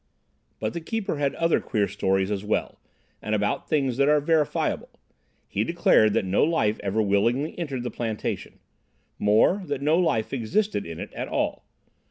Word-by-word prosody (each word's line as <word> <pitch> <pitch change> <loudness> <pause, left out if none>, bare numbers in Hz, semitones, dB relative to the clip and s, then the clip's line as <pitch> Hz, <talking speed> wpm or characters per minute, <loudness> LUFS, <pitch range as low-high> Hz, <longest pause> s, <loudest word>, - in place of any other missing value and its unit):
"But 110 0 -2
the 170 - -4
keeper 200 -2 -3
had 140 -1 0
other 165 0 +2
queer 105 -3 0
stories 95 0 0
as 100 -1 -2
well, 105 - -2 0.4
and 110 - -1
about 105 0 -1
things 135 -5 +1
that 140 +1 +3
are 150 0 +5
verifiable. 150 0 0 0.6
He 105 - -1
declared 115 -8 +3
that - - +1
no 95 +2 +2
life 130 -10 +1
ever 105 +2 0
willingly 115 +9 +1
entered 140 -7 -3
the 125 - -4
plantation; 110 -3 -4 0.6
more, 110 - +3
that 140 -1 -3
no 155 +4 +3
life 150 -12 0
existed 140 - -1
in 85 -1 -7
it - - -7
at - - -4
all. - - -2
120 Hz, 170 wpm, -25 LUFS, 105-155 Hz, 0.6 s, are